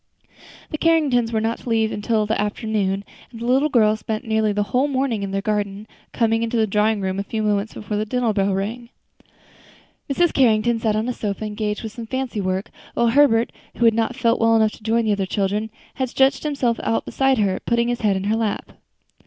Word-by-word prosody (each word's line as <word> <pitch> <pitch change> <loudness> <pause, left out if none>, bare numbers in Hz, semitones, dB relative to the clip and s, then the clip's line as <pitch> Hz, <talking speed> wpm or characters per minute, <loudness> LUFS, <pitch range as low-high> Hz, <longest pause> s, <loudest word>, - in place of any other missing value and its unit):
The 305 - -3
Carringtons 285 -8 +2
were 220 - +1
not 225 +1 -1
to - - -8
leave 225 -1 +2
until 215 +1 0
the 215 0 0
afternoon, 205 -2 -1 0.3
and 230 - -10
the 235 - -5
little 265 +5 +3
girls 220 -5 +3
spent 215 0 -4
nearly 220 -1 +1
the 205 0 0
whole 260 +3 +3
morning 260 -6 -1
in 200 - -3
the 195 0 -2
garden, 205 0 -2 0.2
coming 225 -1 +1
into 230 +1 -1
the 220 - +3
drawing 210 +1 +1
room 190 0 -2
a - - -1
few 220 +2 -3
moments 210 0 0
before 210 0 -4
the 215 - -1
dinner 240 -1 0
bell 200 -1 +1
rang. 230 +5 -4 1.2
Mrs. 345 +4 +2
Carrington 235 -2 +3
sat 220 -2 0
on 215 +2 -1
a 250 - -1
sofa 210 -1 -4
engaged 210 +1 -3
with 220 - -5
some 225 +1 -8
fancy 260 -4 -3
work, 185 +1 -2 0.2
while 235 0 +3
Herbert, 235 -3 +4 0.3
who 240 - +2
had 225 - +6
not 230 +2 0
felt 235 -2 +1
well 225 0 +4
enough 220 -1 +3
to - - -14
join 225 +1 +1
the 215 - +2
other 200 -2 0
children, 205 +3 -1 0.2
had 260 -2 -2
stretched 270 +2 +2
himself 270 -6 0
out 225 - -1
beside 270 -1 +1
her, 195 -3 +1
putting 235 0 +2
his 240 0 -2
head 205 -3 +2
in 190 - -4
her 210 +2 +1
lap. 225 -2 -2
220 Hz, 220 wpm, -22 LUFS, 210-240 Hz, 1.2 s, had